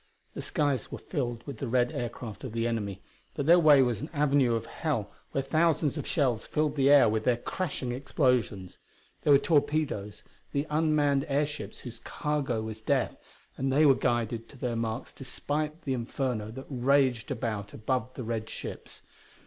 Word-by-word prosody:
The - - -5
skies 140 -6 -1
were - - -4
filled 120 -7 -3
with 140 -6 -7
the 135 - -3
red 125 +1 +2
aircraft 120 -2 -5
of 130 -4 -6
the 115 0 0
enemy, 105 -5 -2 0.3
but 140 - -2
their 170 +3 +7
way 150 -5 +7
was 120 -2 -1
an 150 - -5
avenue 140 -5 +3
of 115 0 -2
hell 115 -3 -2 0.2
where 135 - 0
thousands 155 0 +2
of - - -4
shells 130 -8 +1
filled 150 -1 0
the 135 -1 +3
air 145 -1 +8
with 110 0 0
their 120 0 +3
crashing 135 -3 -3
explosions. 125 - 0 0.4
There 150 - +3
were 140 - +9
torpedoes, 145 - 0 0.3
the 140 +1 0
unmanned 150 -3 +2
airships 145 +1 -1
whose 120 -2 -8
cargo 135 -3 -2
was 110 0 -6
death, - - +1 0.4
and 135 0 0
they 150 +4 +5
were 140 - +8
guided 115 -2 -1
to 140 - -14
their 125 -2 -2
marks 115 +1 -3
despite 150 +4 -3
the 135 - -1
inferno 120 -2 -2
that 130 +4 -8
raged 130 -1 +2
about 115 -6 -2
the 125 +2 -2
red 110 -1 -3
ships - - -7
above. - - -31
130 Hz, 175 wpm, -29 LUFS, 115-145 Hz, 0.4 s, were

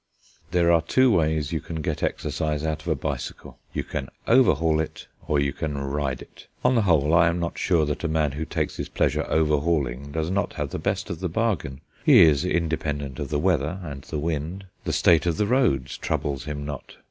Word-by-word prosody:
There 85 -1 +3
are 85 -1 +5
two 130 +9 +3
ways 80 -5 +1
you 80 -3 -1
can 80 +2 -6
get 80 -3 -2
exercise 75 -1 -2
out 80 -1 -2
of 75 - -13
a 80 - +2
bicycle: 70 - -5
you - - -2
can 65 - -5 0.2
"overhaul" 85 -11 +4
it, 80 - -4 0.2
or 75 - +2
you 70 -1 0
can 75 -2 -3
ride 70 -1 -2
it. - - -17 0.2
On 125 - +5
the 120 - +3
whole, 80 -6 +3
I 85 0 +6
am 85 +1 0
not 85 0 -3
sure 85 -4 +2
that 75 +2 -3
a - - +1
man 80 -2 +1
who 75 +3 -4
takes 80 - -3
his - - -4
pleasure - - 0
overhauling 75 -4 +1
does 80 +3 -2
not 100 +1 -1
have - - -4
the - - -3
best - - -2
of 85 - -5
the 90 -1 -2
bargain. 80 - -1 0.2
He - - +8
is 75 -2 +4
independent 75 -5 -2
of 70 -3 -4
the 75 - 0
weather 80 +1 +1
and 70 -5 -7
the 75 - -5
wind; 80 +5 -3 0.2
the - - 0
state 85 0 +4
of 85 - +1
the 105 - +2
roads 100 - +1
troubles 70 -2 -2
him 75 -1 -4
not. 75 -3 -7
80 Hz, 215 wpm, -25 LUFS, 75-85 Hz, 0.2 s, He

